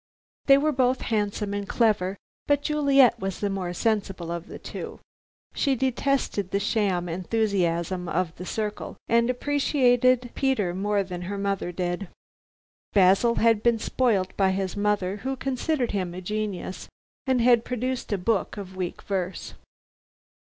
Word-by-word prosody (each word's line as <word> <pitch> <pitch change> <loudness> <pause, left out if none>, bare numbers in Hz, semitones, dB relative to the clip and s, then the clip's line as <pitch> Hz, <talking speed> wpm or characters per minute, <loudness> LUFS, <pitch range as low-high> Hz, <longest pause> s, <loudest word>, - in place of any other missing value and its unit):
They 275 -1 +8
were 305 +2 +2
both 255 -2 +1
handsome 205 -2 -1
and 205 -1 -4
clever, 205 -5 +1 0.3
but 285 0 +2
Juliet 275 -5 +4
was 195 -2 -4
the 205 -1 -1
more 185 -2 -3
sensible 195 -3 -1
of 170 0 -5
the - - -8
two. - - -7 0.5
She 275 -2 +1
detested 260 -5 0
the 200 - 0
sham 200 -4 0
enthusiasm 180 -2 -1
of 170 -1 -1
The 180 - -7
Circle, 210 +1 -4
and 235 +1 +3
appreciated 255 -2 +2
Peter 225 -10 0
more 200 +2 0
than 180 -2 -6
her 200 - -3
mother 195 -2 -2
did. 175 +2 -3 0.9
Basil 195 +4 +4
had 225 -2 +3
been 235 0 +3
spoilt 220 -5 0
by 195 -1 +3
his 190 -1 -2
mother, 205 -2 0
who 265 +6 -3
considered 265 0 -1
him 185 -4 -2
a 185 - -6
genius, 205 -1 -4 0.4
and 260 -1 +3
had 235 -1 +5
produced 250 0 -3
a 205 - +1
book 200 +2 -1
of 190 -2 -8
weak 180 -2 -4
verse. 190 -2 -3
205 Hz, 150 wpm, -26 LUFS, 185-245 Hz, 0.9 s, They